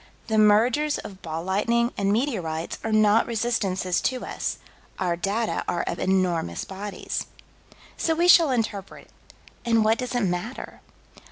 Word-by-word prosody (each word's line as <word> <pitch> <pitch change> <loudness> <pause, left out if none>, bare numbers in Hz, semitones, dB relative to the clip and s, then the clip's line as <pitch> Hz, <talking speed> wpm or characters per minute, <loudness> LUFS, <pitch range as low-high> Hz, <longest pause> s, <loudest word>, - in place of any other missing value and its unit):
The 220 -1 +1
mergers 230 +8 +4
of 195 -2 -9
ball 160 0 -5
lightning 235 +6 +1
and 200 0 0
meteorites 190 - -2
are 225 - -2
not 215 +1 +4
resistances 210 -6 0
to 255 -1 -1
us: - - -3 0.4
our 180 -2 0
data 205 +6 -1
are 175 -1 -1
of 170 - -4
enormous 180 - 0
bodies. 195 0 -5 0.7
So 325 - +1
we 345 +2 +2
shall 335 -3 +7
interpret 220 -6 -3 0.5
and 230 -2 +2
what 220 +1 +3
does 250 0 -3
it 245 - +1
matter? 195 +6 -4
210 Hz, 145 wpm, -25 LUFS, 185-235 Hz, 0.7 s, shall